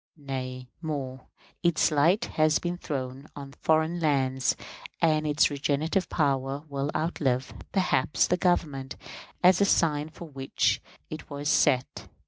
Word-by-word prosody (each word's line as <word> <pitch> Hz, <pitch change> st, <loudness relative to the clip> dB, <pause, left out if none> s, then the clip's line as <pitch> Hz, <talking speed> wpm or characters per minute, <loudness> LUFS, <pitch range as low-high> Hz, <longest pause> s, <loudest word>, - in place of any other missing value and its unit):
Nay, 130 Hz, -3 st, -5 dB
more; 135 Hz, -5 st, -5 dB, 0.3 s
its 170 Hz, -3 st, +3 dB
light 165 Hz, +9 st, +3 dB
has 155 Hz, 0 st, +2 dB
been 175 Hz, 0 st, -3 dB
thrown 135 Hz, -4 st, -5 dB
on 140 Hz, -1 st, -8 dB
foreign 160 Hz, +2 st, +2 dB
lands, 135 Hz, -4 st, +1 dB, 0.4 s
and 155 Hz, -1 st, +2 dB
its 150 Hz, 0 st, +3 dB
regenerative 145 Hz, +6 st, 0 dB
power 140 Hz, -2 st, 0 dB
will 140 Hz, 0 st, -2 dB
outlive, 135 Hz, -6 st, -1 dB, 0.2 s
perhaps, 180 Hz, -7 st, +2 dB
the 180 Hz, -, +2 dB
Government 150 Hz, -7 st, 0 dB, 0.5 s
as 180 Hz, +1 st, +6 dB
a -, -, +6 dB
sign 155 Hz, -5 st, +2 dB
for 170 Hz, +1 st, -10 dB
which 135 Hz, -3 st, 0 dB, 0.3 s
it 155 Hz, -, -7 dB
was 145 Hz, 0 st, -3 dB
set. 130 Hz, -4 st, +2 dB
145 Hz, 130 wpm, -27 LUFS, 135-160 Hz, 0.5 s, as